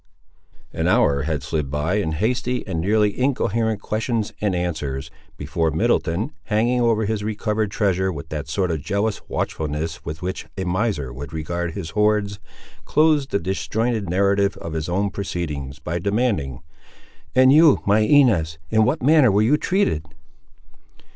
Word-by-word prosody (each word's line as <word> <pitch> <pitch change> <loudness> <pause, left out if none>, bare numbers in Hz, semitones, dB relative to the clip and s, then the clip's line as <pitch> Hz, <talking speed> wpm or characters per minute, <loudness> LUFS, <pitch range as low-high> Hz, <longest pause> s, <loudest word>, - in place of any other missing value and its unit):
An - - -1
hour 70 -1 +3
had 75 -4 -2
slid 75 -2 -2
by, 75 +7 -1
in 80 -6 -1
hasty 120 +7 -1
and 85 -5 -3
nearly 105 +2 +2
incoherent 115 -5 0
questions 110 0 -2
and 100 -3 +1
answers, 80 -6 -3 0.3
before 80 -1 -1
Middleton, 85 - 0
hanging 120 +4 +1
over 115 -2 +2
his 105 0 -2
recovered 105 0 -1
treasure 95 -3 0
with 75 -2 -8
that 75 -1 -5
sort 90 +1 0
of 80 -3 -2
jealous 100 +5 -1
watchfulness 80 +2 -3
with 75 +4 -6
which 95 +1 -4
a 95 - -2
miser 90 - -1
would 70 +3 -8
regard 85 +2 -3
his 85 -6 -5
hoards, 105 0 +1 0.4
closed 150 -3 +2
the - - +1
disjointed 105 +3 -2
narrative 100 +2 +2
of 85 - -7
his 80 +1 -3
own 100 +3 0
proceedings 75 -8 -4
by 85 +3 -4
demanding— 100 - -1 0.7
"And 130 +1 +6
you, 155 -1 +6
my 100 +2 +4
Inez; 110 - +3
in 110 0 +4
what 125 +5 0
manner 150 -2 +6
were 105 +2 +3
you 125 +7 +4
treated?" 160 - 0
100 Hz, 155 wpm, -22 LUFS, 80-110 Hz, 0.7 s, And